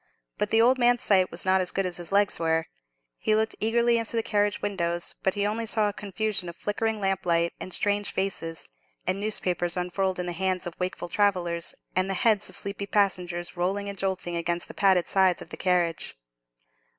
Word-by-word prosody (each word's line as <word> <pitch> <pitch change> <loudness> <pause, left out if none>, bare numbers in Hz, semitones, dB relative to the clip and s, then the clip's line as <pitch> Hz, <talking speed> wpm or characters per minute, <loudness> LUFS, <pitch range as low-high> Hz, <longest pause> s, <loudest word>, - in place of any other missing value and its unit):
But - - 0
the 225 +1 +4
old 255 +2 +4
man's 245 0 +3
sight 190 -3 +3
was 170 - -4
not 190 0 +3
as 180 - +2
good 195 +1 0
as 180 -1 -2
his 175 -2 -4
legs 200 +1 +2
were; 160 -1 +1 0.5
he 215 - +2
looked 220 +1 +1
eagerly 235 +2 +2
into 230 +1 -1
the 225 - +1
carriage 205 -1 +1
windows, 175 -4 -1
but 190 - 0
he 205 0 0
only 220 +2 -1
saw 215 -2 +2
a - - -6
confusion 205 -2 -2
of 170 - -9
flickering 220 +3 -2
lamplight, 180 -4 +1
and 185 - -7
strange 205 +2 +1
faces, 175 -4 -3 0.3
and 185 +2 0
newspapers 180 -4 0
unfurled 185 +1 -1
in 180 - -1
the 175 - -2
hands 185 +1 -1
of 175 - -5
wakeful 180 -1 -3
travellers, 175 -3 0 0.2
and 185 +1 +1
the 195 - 0
heads 210 +1 +3
of - - +1
sleepy 200 0 0
passengers 180 -4 0
rolling 195 +3 -1
and 200 - -7
jolting 185 -2 -1
against 170 0 -2
the - - -9
padded 190 -3 +3
sides 190 -2 +3
of 165 - -10
the - - -5
carriage. 175 -3 0
190 Hz, 200 wpm, -26 LUFS, 175-205 Hz, 0.5 s, the